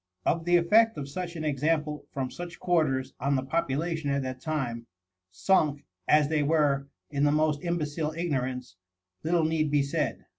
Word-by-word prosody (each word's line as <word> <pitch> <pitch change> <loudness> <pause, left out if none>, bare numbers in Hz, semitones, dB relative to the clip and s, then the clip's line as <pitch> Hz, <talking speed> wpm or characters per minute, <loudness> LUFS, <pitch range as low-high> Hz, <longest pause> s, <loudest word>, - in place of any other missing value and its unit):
Of 165 0 +1
the 175 0 +4
effect 220 +6 +4
of 140 -2 -4
such 175 +4 -5
an 160 - -4
example 150 +1 -1
from 130 -2 -3
such 175 +3 -8
quarters 155 -7 +1
on 140 +2 +1
the 130 - 0
population 160 +1 -1
at 140 0 0
that 130 0 -5
time, 125 -7 -3 0.4
sunk, 145 - +1 0.2
as 150 -1 +5
they 155 0 +1
were, 145 -2 +2 0.2
in 145 -1 0
the 145 - +4
most 150 -1 +1
imbecile 155 -3 -1
ignorance, 130 - -2 0.5
little 165 +1 +2
need 155 -1 +1
be 145 -1 +3
said. 140 - -2
150 Hz, 170 wpm, -28 LUFS, 140-165 Hz, 0.5 s, as